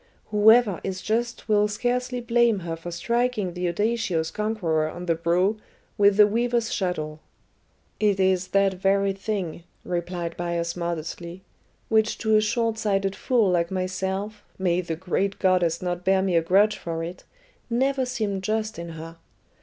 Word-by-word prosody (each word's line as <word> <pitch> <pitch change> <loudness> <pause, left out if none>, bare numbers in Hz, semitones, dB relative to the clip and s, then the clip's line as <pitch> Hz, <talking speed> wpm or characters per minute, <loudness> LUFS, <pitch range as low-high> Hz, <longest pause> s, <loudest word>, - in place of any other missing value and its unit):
Whoever 215 -2 +5
is 190 -1 -3
just 235 +2 -2
will 210 -1 +3
scarcely 245 +3 -1
blame 235 -3 +2
her 165 -1 -4
for 165 +1 -8
striking 225 +1 -1
the 180 0 -2
audacious 205 -5 0
conqueror 180 -8 -1
on 175 +2 -7
the 170 - +2
brow 175 +6 +1 0.4
with 200 -1 +4
the 210 - +8
weaver's 235 +2 0
shuttle." 155 -5 -2 0.8
"It 205 -2 +2
is 185 -1 +2
that 195 0 +2
very 195 +1 +1
thing," 195 -4 -4 0.2
replied 175 -1 -3
Bias 170 -1 -2
modestly, 170 +1 -5 0.4
"which 220 0 +2
to 220 -1 +2
a 215 - +5
short 225 +1 0
sighted 195 -2 0
fool 230 -7 +2
like 170 -1 +1
myself 190 +3 -3
may 180 -1 +1
the 165 -2 -4
great 190 +3 -1
goddess 180 -3 +2
not 175 0 -2
bear 190 0 +3
me 190 -2 0
a 165 - +5
grudge 200 +5 +3
for 165 -1 -4
it! 175 +2 -7 0.5
never 265 +3 +1
seemed 215 -6 -2
just 215 0 -2
in 170 0 -6
her. 165 +1 -9
195 Hz, 155 wpm, -25 LUFS, 175-215 Hz, 0.8 s, the